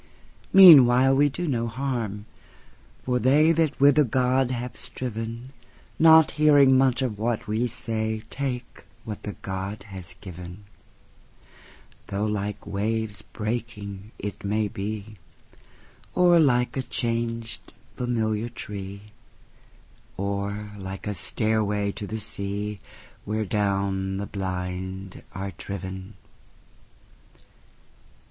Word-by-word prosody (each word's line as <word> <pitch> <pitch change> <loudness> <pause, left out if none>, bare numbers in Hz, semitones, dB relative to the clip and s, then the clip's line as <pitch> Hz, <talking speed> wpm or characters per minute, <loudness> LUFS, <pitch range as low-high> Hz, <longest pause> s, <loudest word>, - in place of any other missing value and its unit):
Meanwhile 135 -8 +9
we 145 +1 +4
do 175 +5 -4
no 120 -5 0
harm; 115 -5 -3 0.8
for 125 -1 0
theyThat 155 +4 +3
with 140 +1 +6
a - - +7
god 130 +1 +1
have 125 0 -4
striven, 115 +1 -6 0.5
Not 160 -1 +7
hearing 145 -3 +6
much 130 0 +3
of 110 -5 -3
what 115 0 -1
we 110 +3 0
say, 110 -2 -2
Take 125 -3 -5 0.2
what 105 -2 -6
the 105 - -5
god 95 +2 -4
has 90 -3 -8
given; 90 +1 -9 1.4
Though 100 +2 -2
like 105 -1 -3
waves 110 +1 -2
breaking 105 -3 -5
it 105 - -6
may 105 +1 0
be, 105 0 -6 1.0
Or 175 -1 +6
like 125 -5 +3
a 135 - 0
changed 115 -2 -3 0.2
familiar 115 -2 -1
tree, 100 -3 -7 1.1
Or 100 +1 -3
like 95 0 -7
a 105 - -2
stairway 105 +1 0
to 105 0 -7
the 110 - -5 1.1
seaWhere 110 0 -1
down 95 -1 0
the 100 - -3
blind 95 0 -5
are 95 +1 -4
driven. 95 +1 -6
110 Hz, 105 wpm, -25 LUFS, 100-125 Hz, 1.4 s, Meanwhile